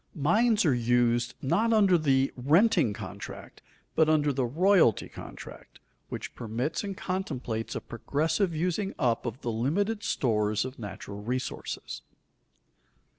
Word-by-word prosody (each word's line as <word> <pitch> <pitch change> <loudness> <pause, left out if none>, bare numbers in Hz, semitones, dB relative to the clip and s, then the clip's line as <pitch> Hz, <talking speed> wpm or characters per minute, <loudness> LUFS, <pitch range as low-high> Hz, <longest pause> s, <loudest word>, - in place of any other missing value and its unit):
Mines 210 - +3
are 145 - +4
used 120 0 +1
not 215 +12 +2
under 200 -5 +5
the 135 -4 +2
renting 150 - +3
contract, - - -8 0.3
but 160 -1 +3
under 150 -2 +3
the 130 -2 0
royalty 170 - +3
contract, - - -11 0.3
which - - -6
permits 120 - -3
and 200 -2 -5
contemplates 130 - -3
a - - -3
progressive 160 - -1
using 180 +5 -1
up 120 -3 0
of 120 +2 -5
the 120 - -2
limited 195 - 0
stores 110 - 0
of 130 0 -8
natural 100 -1 -7
resources. 125 +4 -4
140 Hz, 125 wpm, -28 LUFS, 120-185 Hz, 0.3 s, under